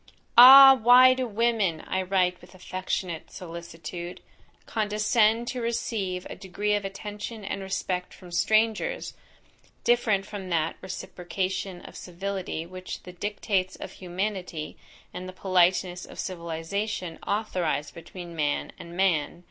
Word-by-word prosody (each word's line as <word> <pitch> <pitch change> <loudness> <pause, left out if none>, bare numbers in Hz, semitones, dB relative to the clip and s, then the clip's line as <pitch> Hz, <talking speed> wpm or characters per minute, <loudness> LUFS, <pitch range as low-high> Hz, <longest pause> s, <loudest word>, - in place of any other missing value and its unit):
Ah! 270 +2 +11
why 255 +1 +7
do 255 -1 -2
women, 215 -7 0
I 190 - -2
write 185 -1 +1
with 180 +1 -16
affectionate 185 -2 -4
solicitude, 170 0 -8 0.5
condescend 215 +2 +1
to 250 - -4
receive 205 -5 -2
a - - -7
degree 205 +2 -2
of 205 -1 0
attention 205 +2 -7
and 195 - -4
respect 185 -1 -3
from 180 -2 -14
strangers, 220 - +1 0.7
different 220 -5 +2
from 195 -2 -7
that 165 -2 0
reciprocation 185 0 -4
of - - -12
civility 185 -2 -5
which 185 +1 -8
the 180 - -10
dictates 190 -1 -2
of - - -8
humanity, 180 -3 -4 0.4
and 180 +1 -6
the - - -9
politeness 180 -1 +1
of - - -12
civilization 175 +1 -4
authorise 180 -8 -1
between 170 +1 -10
man 145 -2 -1
and 170 +1 -10
man? 170 -4 +1
190 Hz, 125 wpm, -26 LUFS, 175-210 Hz, 0.7 s, Ah